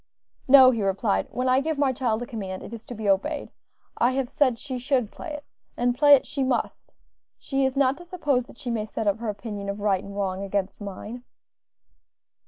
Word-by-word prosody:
"No," 260 Hz, -1 st, +9 dB
he 230 Hz, -3 st, -2 dB
replied, 190 Hz, -, 0 dB
"when 255 Hz, +1 st, -2 dB
I 255 Hz, +1 st, +4 dB
give 315 Hz, +1 st, -2 dB
my 280 Hz, -2 st, +2 dB
child 245 Hz, -3 st, -1 dB
a -, -, -5 dB
command, 200 Hz, -7 st, -6 dB
it -, -, -9 dB
is 230 Hz, -1 st, -9 dB
to 245 Hz, -, -7 dB
be 215 Hz, -1 st, -4 dB
obeyed; 240 Hz, +10 st, 0 dB, 0.5 s
I 245 Hz, +2 st, +3 dB
have 265 Hz, -2 st, -2 dB
said 260 Hz, -5 st, +2 dB
she 260 Hz, 0 st, -5 dB
should 250 Hz, -3 st, 0 dB
play 330 Hz, -, -8 dB
it, 295 Hz, -1 st, -7 dB, 0.3 s
and 245 Hz, 0 st, +1 dB
play 290 Hz, +2 st, +8 dB
it 265 Hz, -, -1 dB
she 275 Hz, -, -2 dB
must; 260 Hz, -2 st, -2 dB, 0.4 s
she 270 Hz, -1 st, -1 dB
is 265 Hz, +1 st, -1 dB
not 275 Hz, 0 st, +3 dB
to -, -, -10 dB
suppose 295 Hz, -8 st, -1 dB
that -, -, -15 dB
she 245 Hz, -, -4 dB
may 220 Hz, -2 st, -1 dB
set 220 Hz, +1 st, -4 dB
up 205 Hz, +1 st, +1 dB
her 230 Hz, -2 st, -3 dB
opinion 205 Hz, -1 st, -5 dB
of 200 Hz, +1 st, -4 dB
right 200 Hz, -2 st, +1 dB
and 200 Hz, 0 st, -9 dB
wrong 190 Hz, -1 st, -2 dB
against 200 Hz, +1 st, -2 dB
mine." 210 Hz, +4 st, -7 dB
245 Hz, 215 wpm, -25 LUFS, 205-270 Hz, 0.5 s, No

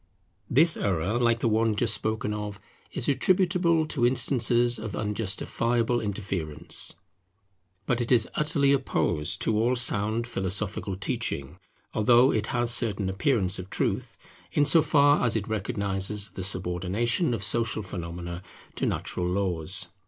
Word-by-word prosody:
This 155 Hz, +6 st, +5 dB
error, 100 Hz, +4 st, -1 dB
like 120 Hz, -1 st, +2 dB
the -, -, +1 dB
one 110 Hz, 0 st, +1 dB
just 110 Hz, 0 st, +2 dB
spoken 110 Hz, -1 st, -2 dB
of, 105 Hz, -1 st, -5 dB, 0.3 s
is -, -, -3 dB
attributable 175 Hz, +1 st, +2 dB
to 135 Hz, -, -2 dB
instances 120 Hz, -1 st, +3 dB
of 110 Hz, -2 st, -6 dB
unjustifiable 115 Hz, +3 st, 0 dB
interference. 95 Hz, -7 st, -2 dB, 0.9 s
But 120 Hz, +3 st, 0 dB
it 120 Hz, -, -2 dB
is 115 Hz, -3 st, +4 dB
utterly 150 Hz, -2 st, +2 dB
opposed 90 Hz, -, -1 dB
to 110 Hz, -, +1 dB
all 120 Hz, +4 st, +2 dB
sound 115 Hz, -1 st, +2 dB
philosophical 100 Hz, -2 st, -3 dB
teaching, 90 Hz, -5 st, -3 dB, 0.3 s
although 120 Hz, +4 st, +4 dB
it 110 Hz, 0 st, -1 dB
has 120 Hz, -1 st, +1 dB
a -, -, +3 dB
certain 105 Hz, -5 st, 0 dB
appearance 95 Hz, -1 st, 0 dB
of 90 Hz, +1 st, -8 dB
truth, -, -, -2 dB, 0.3 s
in 145 Hz, -, +2 dB
so 160 Hz, +3 st, +5 dB
far 145 Hz, -2 st, +3 dB
as 120 Hz, -2 st, +2 dB
it 110 Hz, -1 st, -2 dB
recognizes 100 Hz, -1 st, -2 dB
the 95 Hz, -, -6 dB
subordination 95 Hz, -, -1 dB
of 100 Hz, -, -6 dB
social 110 Hz, +2 st, -1 dB
phenomena 85 Hz, -1 st, -6 dB, 0.4 s
to -, -, 0 dB
natural 90 Hz, -1 st, -2 dB
laws. 90 Hz, -1 st, -2 dB
110 Hz, 140 wpm, -26 LUFS, 95-120 Hz, 0.9 s, This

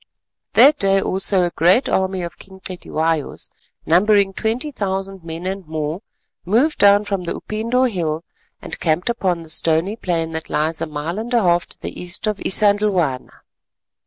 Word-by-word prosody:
That 295 Hz, +1 st, +6 dB
day 195 Hz, 0 st, +3 dB
also 190 Hz, 0 st, +1 dB
a 175 Hz, -, 0 dB
great 180 Hz, -, +3 dB
army 190 Hz, -1 st, 0 dB
of 170 Hz, -, -7 dB
King 190 Hz, -1 st, -14 dB
Cetywayo's, 165 Hz, -4 st, -3 dB, 0.3 s
numbering 195 Hz, +3 st, +3 dB
twenty 235 Hz, +9 st, -2 dB
thousand 195 Hz, -5 st, -4 dB
men 165 Hz, +1 st, -6 dB
and 190 Hz, +1 st, -3 dB
more, 155 Hz, +3 st, -3 dB, 0.4 s
moved 240 Hz, -, +1 dB
down 205 Hz, +1 st, +5 dB
from 195 Hz, -3 st, -3 dB
the -, -, -3 dB
Upindo 230 Hz, +4 st, -1 dB
Hill 165 Hz, -7 st, -2 dB, 0.4 s
and -, -, -7 dB
camped 175 Hz, +7 st, 0 dB
upon 180 Hz, -7 st, -1 dB
the 160 Hz, -, -14 dB
stony 165 Hz, +7 st, +1 dB
plain 165 Hz, -6 st, -2 dB
that 160 Hz, 0 st, -5 dB
lies 155 Hz, +2 st, 0 dB
a -, -, -1 dB
mile 155 Hz, +5 st, -4 dB
and 230 Hz, +2 st, -5 dB
a 230 Hz, -, +3 dB
half 175 Hz, -1 st, +2 dB
to -, -, -13 dB
the -, -, -6 dB
east 180 Hz, +3 st, -5 dB
of 210 Hz, -1 st, -1 dB
Isandhlwana. 200 Hz, -9 st, +1 dB
190 Hz, 165 wpm, -20 LUFS, 165-205 Hz, 0.4 s, That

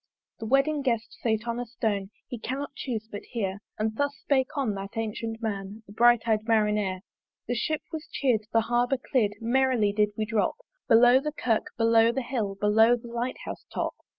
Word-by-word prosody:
The 225 Hz, -, -5 dB
wedding 275 Hz, +4 st, +2 dB
guest 235 Hz, -4 st, -1 dB
sate 220 Hz, 0 st, 0 dB
on 235 Hz, 0 st, -2 dB
a 245 Hz, -, -3 dB
stone, 210 Hz, -4 st, -2 dB, 0.2 s
He 245 Hz, -, -6 dB
cannot 270 Hz, +5 st, -4 dB
chuse 225 Hz, -5 st, -4 dB
but 205 Hz, -2 st, -7 dB
hear: 200 Hz, -5 st, -4 dB, 0.2 s
And 220 Hz, 0 st, -1 dB
thus 285 Hz, 0 st, 0 dB
spake 265 Hz, -2 st, +1 dB
on 260 Hz, -7 st, 0 dB
that 195 Hz, 0 st, -6 dB
ancyent 225 Hz, +1 st, -4 dB
man, 205 Hz, 0 st, -4 dB
The 205 Hz, -, -13 dB
bright 240 Hz, +1 st, +4 dB
eyed 215 Hz, -1 st, +1 dB
Marinere. 210 Hz, -4 st, +1 dB, 0.5 s
The 245 Hz, -, 0 dB
Ship 305 Hz, +6 st, -1 dB
was 320 Hz, 0 st, -6 dB
cheer'd, 230 Hz, -6 st, +1 dB
the 225 Hz, -, +4 dB
Harbour 245 Hz, +3 st, +1 dB
clear'd 235 Hz, -5 st, 0 dB
Merrily 240 Hz, -3 st, +2 dB
did 210 Hz, 0 st, +2 dB
we 215 Hz, -, 0 dB
drop 215 Hz, -2 st, 0 dB, 0.3 s
Below 245 Hz, +2 st, +7 dB
the 300 Hz, +2 st, -3 dB
Kirk, 230 Hz, -7 st, 0 dB
below 230 Hz, 0 st, +5 dB
the 265 Hz, +2 st, -2 dB
Hill, 225 Hz, -6 st, -2 dB
Below 220 Hz, +4 st, +4 dB
the 235 Hz, 0 st, -10 dB
Light 235 Hz, +2 st, -3 dB
house -, -, -6 dB
top. -, -, -2 dB
230 Hz, 190 wpm, -27 LUFS, 215-250 Hz, 0.5 s, Below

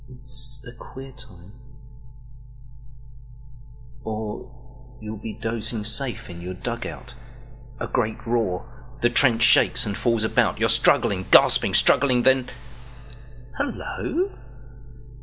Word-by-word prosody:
It's 125 Hz, 0 st, -2 dB
a -, -, -9 dB
queer 130 Hz, +2 st, -12 dB
time. 100 Hz, -8 st, -14 dB, 2.5 s
Or 125 Hz, +3 st, -9 dB
you'll 110 Hz, 0 st, -7 dB
be 110 Hz, -, -6 dB
dozing 115 Hz, 0 st, -2 dB
safe 115 Hz, +4 st, 0 dB
in 85 Hz, -1 st, -10 dB
your 90 Hz, +1 st, -6 dB
dug 115 Hz, +4 st, -5 dB
out—A 125 Hz, 0 st, -12 dB
great 110 Hz, -3 st, -2 dB
roar—the 115 Hz, +1 st, -3 dB
trench 120 Hz, -3 st, +3 dB
shakes 120 Hz, +1 st, +4 dB
and 100 Hz, -2 st, -3 dB
falls 115 Hz, -1 st, +1 dB
about—You're 110 Hz, -, +1 dB
struggling, 95 Hz, -2 st, +2 dB
gasping, -, -, +5 dB
struggling, 125 Hz, -3 st, +4 dB
then… 130 Hz, -1 st, +3 dB, 1.1 s
hullo! 345 Hz, +5 st, -3 dB
120 Hz, 100 wpm, -23 LUFS, 110-125 Hz, 2.5 s, gasping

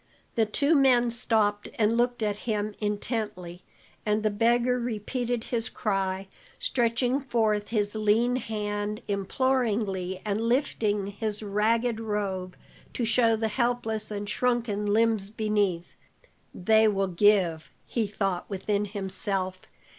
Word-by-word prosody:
The 225 Hz, -2 st, +2 dB
two 280 Hz, +8 st, +2 dB
men 250 Hz, -5 st, +4 dB
stopped 220 Hz, -3 st, +1 dB
and 220 Hz, 0 st, +2 dB
looked 240 Hz, -1 st, +1 dB
at 210 Hz, -1 st, 0 dB
him 210 Hz, -1 st, -1 dB
intently, 205 Hz, -4 st, -3 dB, 0.4 s
and 210 Hz, 0 st, 0 dB
the 215 Hz, -, +2 dB
beggar 240 Hz, +3 st, +2 dB
repeated 240 Hz, +1 st, -2 dB
his 235 Hz, -2 st, -2 dB
cry, 195 Hz, -2 st, -2 dB, 0.3 s
stretching 245 Hz, -, +1 dB
forth 220 Hz, -6 st, 0 dB
his 205 Hz, -3 st, 0 dB
lean 220 Hz, +3 st, +2 dB
hand 210 Hz, -2 st, -3 dB
imploringly 200 Hz, -3 st, 0 dB
and 210 Hz, +1 st, -1 dB
lifting 225 Hz, -4 st, +1 dB
his 210 Hz, +1 st, -4 dB
ragged 220 Hz, +3 st, +1 dB
robe 200 Hz, -4 st, -3 dB, 0.4 s
to 240 Hz, -, -1 dB
show 230 Hz, 0 st, +4 dB
the 220 Hz, 0 st, -1 dB
helpless 225 Hz, -2 st, -1 dB
and 205 Hz, -1 st, -4 dB
shrunken 230 Hz, -4 st, 0 dB
limbs 215 Hz, -1 st, +2 dB
beneath. 205 Hz, -5 st, -1 dB, 0.6 s
"They 220 Hz, +4 st, +4 dB
will 195 Hz, -2 st, +1 dB
give," 185 Hz, -3 st, +2 dB, 0.2 s
he 225 Hz, -3 st, -1 dB
thought 195 Hz, -3 st, -2 dB
within 205 Hz, +1 st, -1 dB
himself. 190 Hz, -2 st, -2 dB
215 Hz, 125 wpm, -27 LUFS, 205-235 Hz, 0.6 s, men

